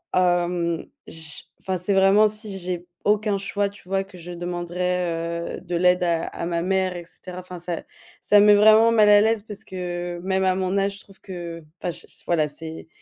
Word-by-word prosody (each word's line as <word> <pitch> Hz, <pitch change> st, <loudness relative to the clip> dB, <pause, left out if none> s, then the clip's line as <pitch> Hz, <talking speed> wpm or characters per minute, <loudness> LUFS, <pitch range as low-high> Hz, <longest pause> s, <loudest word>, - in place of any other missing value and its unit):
hem, 175 Hz, -2 st, +1 dB, 0.2 s
j 160 Hz, -2 st, -6 dB, 0.2 s
enfin 190 Hz, -1 st, -2 dB
c'est 180 Hz, +3 st, 0 dB
vraiment 195 Hz, +3 st, +5 dB
si 210 Hz, -2 st, -2 dB
j'ai 180 Hz, -1 st, -4 dB, 0.2 s
aucun 210 Hz, -1 st, +2 dB
choix 200 Hz, +1 st, -1 dB
tu 200 Hz, -2 st, -17 dB
vois, 195 Hz, 0 st, 0 dB
que 195 Hz, -1 st, -15 dB
je 175 Hz, +1 st, -9 dB
demanderai, 175 Hz, -1 st, -2 dB
heu, -, -, -10 dB
de 175 Hz, -1 st, -4 dB
l'aide 180 Hz, +1 st, +3 dB
à 170 Hz, -1 st, +1 dB
à -, -, -5 dB
ma 170 Hz, -1 st, -1 dB
mère 190 Hz, -1 st, 0 dB
et 175 Hz, -, -7 dB
cetera. 180 Hz, +1 st, -10 dB
Enfin 180 Hz, -1 st, -9 dB
ça 175 Hz, -1 st, -4 dB, 0.4 s
ça 205 Hz, -, +5 dB
me 205 Hz, -, +6 dB
met 205 Hz, -, +8 dB
vraiment 220 Hz, +2 st, +6 dB
mal 215 Hz, -2 st, +5 dB
à 205 Hz, 0 st, +8 dB
l'aise 220 Hz, -1 st, +2 dB
parce 210 Hz, -1 st, -7 dB
que 175 Hz, -2 st, -5 dB
même 190 Hz, 0 st, 0 dB
à 185 Hz, -1 st, +3 dB
mon 185 Hz, 0 st, -1 dB
âge 195 Hz, 0 st, 0 dB
je -, -, -11 dB
trouve 195 Hz, -, -18 dB
que 170 Hz, -3 st, -7 dB, 0.2 s
enfin 175 Hz, -, -1 dB
j -, -, -7 dB
j -, -, -15 dB
voilà 155 Hz, -3 st, +2 dB
c'est 160 Hz, +2 st, -7 dB
180 Hz, 210 wpm, -23 LUFS, 175-200 Hz, 0.4 s, met